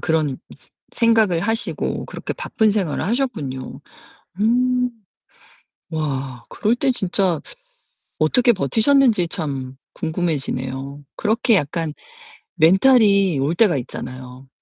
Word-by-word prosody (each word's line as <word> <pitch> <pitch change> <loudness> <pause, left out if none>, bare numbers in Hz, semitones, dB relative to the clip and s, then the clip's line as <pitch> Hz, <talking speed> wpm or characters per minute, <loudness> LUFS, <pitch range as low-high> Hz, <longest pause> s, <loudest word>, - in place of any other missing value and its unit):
그런 155 -4 0 0.5
생각을 225 -7 +3
하시고 225 +5 -2
그렇게 - - -5
바쁜 220 -1 0
생활을 190 -8 -1
하셨군요. 195 - -3 0.6
음. 250 +3 +2 1.0
와. 135 -6 -4
그럴 220 +3 0
때 265 +2 +1
진짜 190 -6 0 0.8
어떻게 240 +10 +3
버티셨는지 220 - +3
참 135 -7 -4 0.2
궁금해지네요. 140 -5 -3
그렇게 225 +2 +2
약간 160 -1 -1 0.6
멘탈이 195 - +4
올 140 +5 0
때가 175 -4 +3
있잖아요. 130 +1 -7
175 Hz, 235 characters per minute, -21 LUFS, 140-225 Hz, 1.0 s, 멘탈이